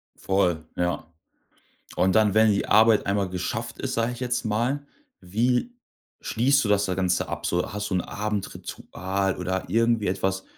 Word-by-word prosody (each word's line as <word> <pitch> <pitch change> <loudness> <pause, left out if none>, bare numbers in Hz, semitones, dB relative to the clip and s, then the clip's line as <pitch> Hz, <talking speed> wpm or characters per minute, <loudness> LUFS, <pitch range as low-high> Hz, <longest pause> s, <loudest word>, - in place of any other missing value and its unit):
Voll, 90 -4 0
ja. 90 -1 -1 0.9
Und 95 0 +2
dann, 110 -2 +4
wenn 110 0 +5
die 100 - 0
Arbeit 110 +1 +5
einmal 100 -1 0
geschafft 110 +6 -4
ist, 135 - -3
sage 115 +1 0
ich 120 - -9
jetzt 125 -1 -1
mal, 120 +7 -1 0.3
wie 120 - 0 0.5
schließt 140 +4 +2
du 105 - -1
das 100 -1 +3
da 95 -2 -1
Ganze 90 -1 0
ab, - - -4
so? 90 +1 -1
Hast 105 +1 -4
du - - 0
'n 90 - +2
Abendritual 100 -2 -3
oder 95 +1 -2
irgendwie 115 -2 +2
etwas, 95 +1 -1
105 Hz, 165 wpm, -25 LUFS, 95-115 Hz, 0.9 s, wenn